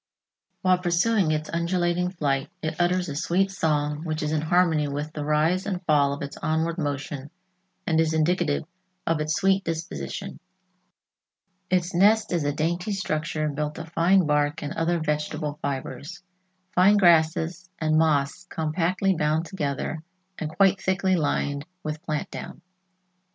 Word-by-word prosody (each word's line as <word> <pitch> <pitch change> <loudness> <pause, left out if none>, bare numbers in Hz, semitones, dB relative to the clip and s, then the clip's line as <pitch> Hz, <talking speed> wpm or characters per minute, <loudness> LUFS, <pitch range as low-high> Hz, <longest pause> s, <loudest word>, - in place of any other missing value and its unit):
While 185 -1 +4
pursuing 180 +2 +2
its 155 0 -1
undulating 175 +1 0
flight, 140 -6 -1
it 155 +2 -2
utters 180 +1 +1
a 145 - -5
sweet 180 +5 +1
song 150 -4 0
which 155 -2 -2
is 150 - -1
in 155 -1 +1
harmony 160 -2 +2
with 145 +2 -4
the 150 - -4
rise 155 +6 +1
and 190 -3 -1
fall 145 -3 +4
of 140 +1 -4
its 140 - -7
onward 165 +2 -1
motion 145 -1 -3 0.6
and 160 -1 +2
is 160 -1 +2
indicative 160 -1 +1 0.4
of 165 -2 +1
its 155 0 0
sweet 195 0 +3
disposition. 160 - -5 1.3
Its 180 -1 +1
nest 205 +3 +4
is 170 -3 +1
a 145 - +2
dainty 170 +7 -1
structure 155 -4 -2
built 150 +1 -3
of 165 0 -7
fine 180 +2 +4
bark 150 0 +1
and 145 - -4
other 170 +1 0
vegetable 150 -1 -2
fibers, 140 +5 -5 0.5
fine 195 +3 +5
grasses 170 0 +3
and 155 -1 +1
moss 155 +3 +1
compactly 170 +5 0
bound 155 0 0
together 155 -3 -3 0.4
and 155 - -3
quite 195 +3 +3
thickly 190 0 +1
lined 145 -3 0 0.2
with 155 0 -4
plant 155 -3 -3
down. - - -8
160 Hz, 150 wpm, -25 LUFS, 150-180 Hz, 1.3 s, fine